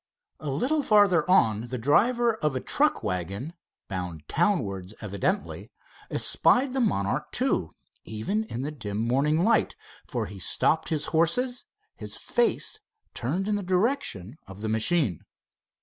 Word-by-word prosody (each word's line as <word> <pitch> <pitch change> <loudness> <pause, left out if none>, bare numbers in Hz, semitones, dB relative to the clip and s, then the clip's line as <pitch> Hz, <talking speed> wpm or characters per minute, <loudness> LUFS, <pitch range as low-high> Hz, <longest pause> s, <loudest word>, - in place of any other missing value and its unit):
A 150 - -5
little 260 - +1
farther 205 - +4
on 115 - +3
the 125 +1 -4
driver 230 - +3
of 150 -8 -1
a - - 0
truck - - +1
wagon, 95 - -3 0.3
bound 90 -5 -5
town 175 -1 +2
wards 95 0 -7
evidently, 115 - -2 0.4
espied 255 +1 +2
the 265 - 0
Monarch 100 - -1
II, - - +1 0.4
even 155 - -2
in 130 - -5
the 145 - -3
dim 105 -8 -5
morning 140 +8 +1
light, 225 +2 +2 0.3
for - - -2
he 100 +1 -9
stopped 155 - +2
his 155 -3 -1
horses, 245 +11 +1 0.3
his - - -6
face 465 -2 0 0.3
turned 170 - -2
in 210 -1 +1
the - - -3
direction 180 - -1
of 95 +1 -10
the 110 - -2
machine. 110 - +2
150 Hz, 145 wpm, -26 LUFS, -, 0.4 s, farther